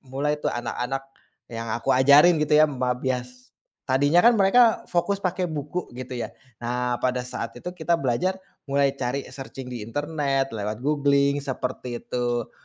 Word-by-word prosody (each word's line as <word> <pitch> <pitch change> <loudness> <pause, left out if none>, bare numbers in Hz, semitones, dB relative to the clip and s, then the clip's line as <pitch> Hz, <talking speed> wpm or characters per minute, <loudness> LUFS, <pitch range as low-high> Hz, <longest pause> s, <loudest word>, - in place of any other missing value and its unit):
mulai 145 +3 -2
tuh, - - 0
anak-anak 125 +3 -3 0.5
yang 115 0 -5
aku 115 +1 0
ajarin 145 +6 +6
gitu 150 0 +3
ya, 155 - +7
membias 125 -2 -3 0.3
tadinya 145 +5 +3
kan, 235 +6 +6
mereka 225 +3 +4
fokus 195 +3 0
pakai 185 0 0
buku 155 +2 -4
gitu 125 0 -6
ya. - - -5 0.2
Nah, 125 +1 -2
pada 125 0 0
saat 125 -2 -6
itu 150 +9 -6
kita 170 -1 0
belajar 150 +5 0 0.3
mulai 140 0 +2
cari 130 +2 -2
searching 135 -1 -8
di 125 - -5
internet 140 0 -1
lewat 105 +1 -4
googling 140 -1 +2
seperti 125 -3 -4
itu. 120 -1 -2
135 Hz, 150 wpm, -24 LUFS, 125-150 Hz, 0.5 s, ya